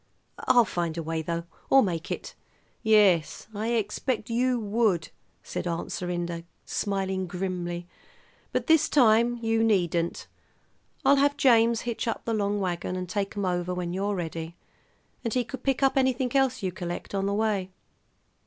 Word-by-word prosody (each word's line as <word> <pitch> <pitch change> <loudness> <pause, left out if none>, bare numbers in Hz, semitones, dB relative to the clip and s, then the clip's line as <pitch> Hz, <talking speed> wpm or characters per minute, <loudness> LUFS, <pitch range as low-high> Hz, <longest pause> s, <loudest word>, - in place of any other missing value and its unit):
I'll 240 -2 +6
find 170 -3 -2
a 165 - -2
way, 160 0 -2
though, 170 +1 -3 0.3
or 270 0 +7
make 170 -5 -3
it." - - -5 0.5
"Yes, 205 -7 +3
I 220 +3 -1
expect 225 +1 -1
you 250 +1 +2
would," 205 -6 +1 0.3
said - - -4
Aunt 170 -1 -3
Serinda, 175 -1 -3 0.2
smiling 190 -2 -2
grimly; 175 -1 -3 0.7
"but - - -1
this 320 -2 +4
time 240 -2 +4
you 225 0 +2
needn't. 175 -6 +1 0.8
I'll 280 - +6
have 285 +1 +3
James 230 -3 +4
hitch 235 -1 -3
up 230 - -3
the 230 - -1
long 205 -1 0
wagon 180 -1 -2
and 185 0 -4
take 200 +2 -3
'em 200 - 0
over 180 0 -1
when 175 -1 -3
you're 200 +2 -1
ready, 165 -1 -5 0.7
and 230 -1 -2
he 250 - +2
could 240 +2 -8
pick 270 0 0
up 270 - +4
anything 260 -1 +1
else 260 -4 +2
you 185 - 0
collect, 175 +1 -6
on 195 0 0
the 200 - 0
way." 205 -3 0
200 Hz, 160 wpm, -27 LUFS, 175-235 Hz, 0.8 s, or